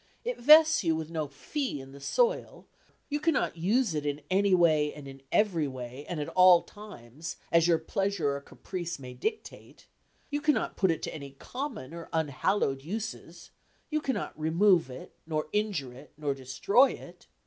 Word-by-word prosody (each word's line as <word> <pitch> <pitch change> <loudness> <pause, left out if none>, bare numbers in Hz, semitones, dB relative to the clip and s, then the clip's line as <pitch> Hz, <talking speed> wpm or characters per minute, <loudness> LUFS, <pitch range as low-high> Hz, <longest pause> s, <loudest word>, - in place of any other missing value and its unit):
It - - -3
vests 310 +1 +7
you 165 -2 +2
with 160 0 -5
no 155 -3 -2
fee 195 - -4
in 135 0 -11
the 140 - -12
soil; 485 - 0 0.4
you 295 0 -2
cannot 320 - +1
use 205 +5 +1
it 150 -1 -2
in 145 0 -2
any 195 0 +4
way, 155 -4 +3
and 145 -2 -10
in 135 0 -11
every 180 -8 +2
way, 130 +1 -8
and 175 - -3
at 145 - -3
all 185 -1 +6
times, 165 - -9 0.2
as 170 0 +4
your 170 -1 +4
pleasure 165 -3 -1
or 140 - -6
caprice 170 +3 -6
may 125 -2 -9
dictate; 435 +2 -6 0.5
you 290 0 -1
cannot 295 -6 +1
put 190 - +2
it 165 - -1
to - - -4
any 140 -3 -8
common 245 - -6
or 170 -1 -8
unhallowed 145 -1 0
uses; 175 -2 -6 0.4
you 305 0 0
cannot 270 -3 -2
remove 170 0 +3
it, 130 - -10
nor 155 -2 -2
injure 195 -12 -1
it, 135 +4 -14
nor 145 -2 -1
destroy 135 - +3
it. - - -13
165 Hz, 175 wpm, -29 LUFS, 145-210 Hz, 0.5 s, vests